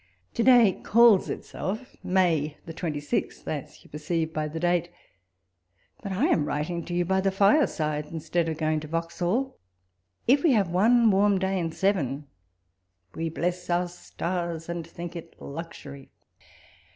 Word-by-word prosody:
To 235 - -1
day 235 -6 +5
calls 230 -3 +5
itself 220 +7 -5
May 165 -5 +1
the 165 - -7
26th, 150 -4 -3
as - - -5
you - - -19
per 150 - -6
ceive 160 +1 -1
by 155 0 -1
the 160 +2 -5
date; 175 0 +1 1.1
but 200 -5 -5
I 195 +9 +1
am 165 - +2
writing 165 +4 -2
to 175 - -4
you 175 0 +1
by 190 +2 +1
the 195 - +2
fire 200 +10 +4
side, 150 -2 -2
instead 165 +1 -2
of 160 - -3
going 155 0 0
to 155 - -8
Vauxhall." 175 - -2 0.7
If 275 +4 +5
we 320 -6 +4
have 200 -6 +2
one 225 +5 +5
warm 200 +1 +3
day 190 0 0
in 165 -2 -2
seven, 160 -6 0 0.4
" 90 0 -47
we 165 0 -2
bless 175 +2 -3
our 175 +1 +1
stars, 170 -1 -4
and 170 -1 -4
think 170 +1 -8
it 165 -1 -10
luxury." 140 -3 -9
175 Hz, 165 wpm, -26 LUFS, 155-190 Hz, 1.1 s, day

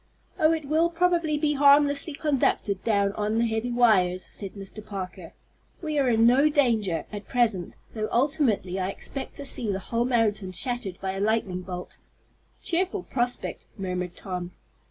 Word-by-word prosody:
"Oh, 310 -1 +5
it 320 -2 -1
will 315 +4 +2
probably 340 -3 +1
be 295 0 +1
harmlessly 285 +1 +4
conducted 270 -10 0
down 200 -3 +2
on 210 +1 -1
the 230 - +3
heavy 225 +2 -1
wires," 190 -7 +3
said 195 -2 -6
Mr. 200 +1 -8
Parker. 190 -4 -7 0.5
"We 305 -3 -1
are 265 -2 +3
in 225 -1 +4
no 265 +6 +5
danger, 220 - +1
at 205 -1 -7
present, 225 -8 +1 0.2
though 215 -1 -3
ultimately 240 - +1
I 185 0 -1
expect 270 +6 -6
to 285 - -6
see 230 -5 -2
the 190 - -1
whole 230 +5 -1
mountain 215 -6 +1
shattered 240 -5 -2
by 190 - -1
a 195 - -5
lightning 205 -4 0
bolt." 180 -1 -7 0.7
"Cheerful 370 +2 0
prospect," 245 -1 -3
murmured 180 -2 -4
Tom. 180 -2 -5
225 Hz, 160 wpm, -26 LUFS, 195-285 Hz, 0.7 s, Oh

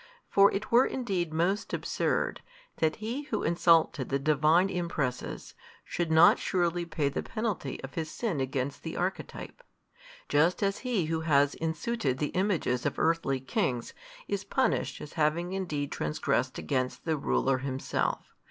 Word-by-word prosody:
For 200 0 +6
it 200 +2 -4
were 240 +3 +6
indeed 190 -10 -2
most 175 +6 0
absurd, - - -1 0.4
that 155 -1 +1
he 240 +7 -4
who 220 -7 -2
insulted 165 -5 +3
the 140 - +1
Divine 155 +5 +3
Impresses, 160 -9 -3 0.3
should 170 -2 -2
not 160 +2 +7
surely 175 -2 0
pay 155 -3 -1
the 140 - -2
penalty 215 - -3
of 135 - -7
his 160 -2 -3
sin 175 - -2
against 135 +1 -2
the 160 - -5
Archetype. 190 - -4 0.7
Just 160 +7 +2
as 200 0 0
he 240 -9 0
who 160 0 -1
has 145 -3 +3
in 160 0 -2
suited 155 - -1
the 150 +1 -1
images 180 -10 0
of - - -1
earthly 160 -5 +1
kings, 125 -2 -2 0.3
is - - -2
punished - - 0
as 150 - -9
having 170 +3 0
indeed 150 -7 -2
transgressed 75 0 -1
against 130 -2 -2
the 160 -2 +1
ruler 135 -2 +1
himself. 130 0 -2
160 Hz, 150 wpm, -29 LUFS, 140-185 Hz, 0.7 s, not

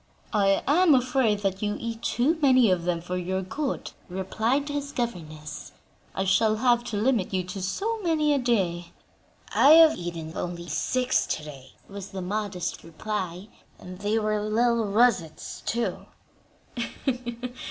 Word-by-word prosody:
"I 195 -2 +3
am 320 +1 +5
afraid 245 -5 +2
that 195 -1 -1
you 205 0 -1
eat 230 -1 -5
too 290 +8 +1
many 255 -6 +5
of 175 -2 0
them 175 -1 0
for 180 +1 -4
your 190 +1 -2
good," 275 +9 -3 0.2
replied 220 +9 -1
his 285 -1 -3
governess; 155 - -5 0.4
"I 190 - 0
shall 215 +3 +3
have 240 +1 +3
to 215 - -3
limit 225 -2 +1
you 185 - 0
to 180 +2 -6
so 430 - -2
many 310 -4 +2
a 280 - +2
day." 180 -9 0 0.6
"I 290 - +7
have 325 -1 +8
eaten 170 -2 -6
only 175 -1 -5
six 255 - +1
to - - -2
day," 135 -3 -11
was 200 0 -8
the 190 -2 -6
modest 195 -2 -3
reply, 185 +2 -5 0.3
"and 180 0 -10
they 205 +2 0
were 215 -1 0
little 230 +2 +2
russets, 200 -6 +1
too." 235 +1 -2
210 Hz, 150 wpm, -26 LUFS, 180-245 Hz, 0.6 s, have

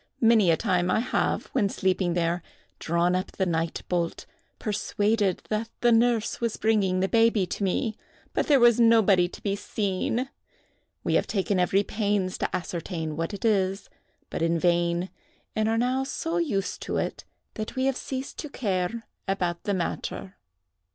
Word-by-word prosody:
"Many 225 -5 +5
a 165 - +4
time 180 +1 +1
I - - +3
have, 250 - 0
when 210 -7 +2
sleeping 185 -2 0
there, 170 0 0 0.4
drawn 170 +2 +1
up 185 +2 -3
the 190 - 0
night 165 -1 -1
bolt, 170 -2 -1 0.3
persuaded 205 -1 0
that 220 +1 -1
the 240 - +4
nurse 230 -1 +2
was 230 -2 -1
bringing 200 -4 +2
the 190 - +2
baby 225 -2 +3
to 190 - -4
me; 210 +3 0 0.4
but - - 0
there 285 -3 +5
was 240 -1 +6
nobody 220 -6 +5
to - - -12
be 200 -1 0
seen. 205 +4 -1 0.8
We - - 0
have - - +2
taken 195 -1 0
every 190 +3 +3
pains 205 -3 -1
to - - -1
ascertain 165 -3 -4
what 165 +3 -2
it 200 +2 -5
is, 195 -3 +1 0.4
but - - -3
in 165 0 +2
vain; 175 +1 +1 0.4
and 215 0 +1
are 225 - +1
now 255 +3 +1
so 325 +5 -3
used 215 - -1
to - - -2
it, - - -3 0.3
that 215 +3 -5
we 260 0 0
have 270 -1 +2
ceased 265 +1 -5
to 300 - -5
care 205 -2 -2 0.2
about 180 -3 -1
the 205 - +1
matter." 185 +1 -4
200 Hz, 170 wpm, -26 LUFS, 180-225 Hz, 0.8 s, was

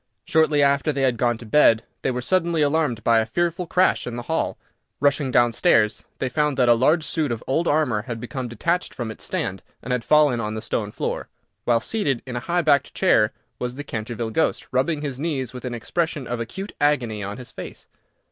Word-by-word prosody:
Shortly 155 -2 +3
after 140 +2 +2
they 140 -1 -1
had 130 -2 +3
gone 120 -1 +1
to 115 - -11
bed 115 -2 +4 0.2
they - - 0
were 125 -1 -2
suddenly 170 0 +1
alarmed 145 -6 0
by 115 -1 +4
a 110 - +1
fearful 175 +7 -1
crash 180 -3 +2
in 120 - -4
the 120 - -5
hall. 160 +6 -1 0.4
Rushing 140 -1 +2
down 120 -2 +3
stairs, 105 -1 +2
they 130 - -1
found 150 +2 0
that 125 -2 +3
a 120 - +7
large 150 +8 +3
suit 150 -3 -1
of 115 -1 -4
old 160 +6 0
armour 145 -8 +2
had 115 0 -6
become 125 +1 -5
detached 170 +10 -1
from 120 -3 -4
its - - -9
stand, 95 0 -3 0.2
and 125 - -3
had 125 -2 -1
fallen 150 -5 +4
on 110 -1 -3
the 110 - -4
stone 105 -2 -2
floor, - - -3 0.4
while 120 -1 +3
seated 140 - -1
in 125 -2 -6
a - - -1
high 175 +6 0
backed 140 -3 +2
chair 110 - +3 0.3
was 125 0 -3
the 145 - -6
Canterville 115 -2 -4
ghost, 160 - 0
rubbing 145 +4 +1
his 135 -3 -3
knees 140 -6 -2
with 125 0 -8
an 125 -1 -3
expression 155 +3 -2
of 120 0 -3
acute 190 - -6
agony 125 -8 +1
on 100 +2 -5
his 125 -1 -8
face. - - -9
130 Hz, 215 wpm, -23 LUFS, 115-150 Hz, 0.4 s, a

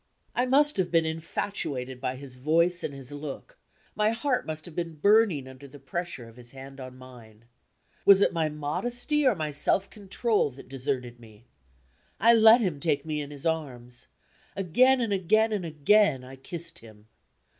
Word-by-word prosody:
I 250 +1 0
must 290 +2 +3
have 185 -2 0
been 165 -1 +2
infatuated 160 -6 -4
by 130 -1 -2
his 135 -1 -10
voice 165 +7 +1
and - - -3
his 135 -1 -8
look; 150 - -8 0.4
my 210 0 +2
heart 250 +3 -1
must 155 0 -5
have 170 -3 -11
been 170 -2 -4
burning 200 -5 +3
under 130 +2 -12
the 140 - -13
pressure 140 -2 -5
of 115 +1 -16
his 120 0 -13
hand 135 +1 -11
on 130 -1 -9
mine. 120 -4 -15 0.6
Was 200 -1 +7
it - - +2
my 160 -2 0
modesty 240 - 0
or 250 - +3
my 155 -3 -3
self 170 +6 +1
control 210 -2 0
that 135 - -13
deserted 130 -3 -4
me? 110 -1 -17 0.7
I 230 +3 +6
let 225 +1 +7
him 175 -9 -1
take 150 0 -1
me 155 -1 -2
in 145 - -7
his 145 0 -9
arms. 125 -7 -3 0.5
Again, 250 +8 +3
and 225 -4 0
again, 215 +4 +2
and 205 -4 -2
again 155 -1 +3
I 130 +1 -11
kissed 170 +5 -4
him. 110 -2 -16
155 Hz, 175 wpm, -27 LUFS, 130-200 Hz, 0.7 s, Was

